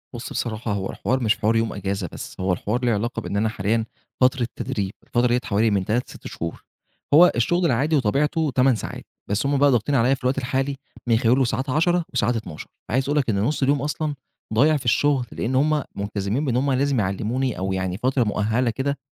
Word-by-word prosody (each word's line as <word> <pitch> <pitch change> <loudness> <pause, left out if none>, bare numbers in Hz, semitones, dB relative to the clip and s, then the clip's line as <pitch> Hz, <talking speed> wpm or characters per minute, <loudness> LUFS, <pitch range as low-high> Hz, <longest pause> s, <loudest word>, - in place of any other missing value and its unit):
بُصّ 120 - -6
بصراحة 110 -1 -3
هو 95 -1 -3
الحوار 130 +1 -1
مش 110 0 +2
حوار 110 +1 +1
يوم 115 -1 +1
إجازة 95 -3 -3
بس، - - -9
هو 95 -1 +1
الحوار 120 +7 -2
له 120 - +3
علاقة 115 +3 -1
بإن 100 - -3
أنا 110 +1 +1
حاليًا 110 +2 0 0.4
فترة 125 -1 +3
تدريب 100 -7 -3
الفترة 120 +1 +1
ديّة 120 +1 +2
حوالي 110 -1 +2
من 95 -2 +1
3 120 +3 -1
ل6 - - -10
شهور، 85 0 -6 0.5
هو 175 +4 +8
الشغل 175 +10 +1
العادي 145 +4 +2
وطبيعته 145 +5 +1
8 130 -1 +4
ساعات، - - -6 0.3
بس 105 +6 0
هم 140 0 +2
بقى 140 0 +5
ضاغطين 125 +4 +1
عليَّ 130 +3 +3
في 130 - -18
الوقت 130 +2 +1
الحالي 135 +2 -1 0.3
من 115 -1 +4
خلال 120 +2 +3
وساعات 130 +2 0
10 165 +4 +2
وساعات 120 - +1
12 90 -9 -6 0.2
فعايز 130 +4 +1
أقول 150 - +1
لك 130 -5 +1
إن 100 -2 +1
نص 140 +4 0
اليوم 140 0 +2
أصلًا 150 0 -2 0.4
ضايع 150 +7 +4
في 130 - -9
الشغل؛ 135 +2 +2
لأن 130 +3 -2
هم 150 +1 +2
ملتزمين 100 +6 -2
بإن 125 -3 0
هم 135 +1 +1
لازم 135 -1 +1
يعلموني، 110 +5 -1
أو 95 +1 -2
يعني 95 -1 -2
فترة 130 +2 +1
مؤهلة 110 +4 0
كده، 135 +5 -2
120 Hz, 210 wpm, -23 LUFS, 105-135 Hz, 0.5 s, هو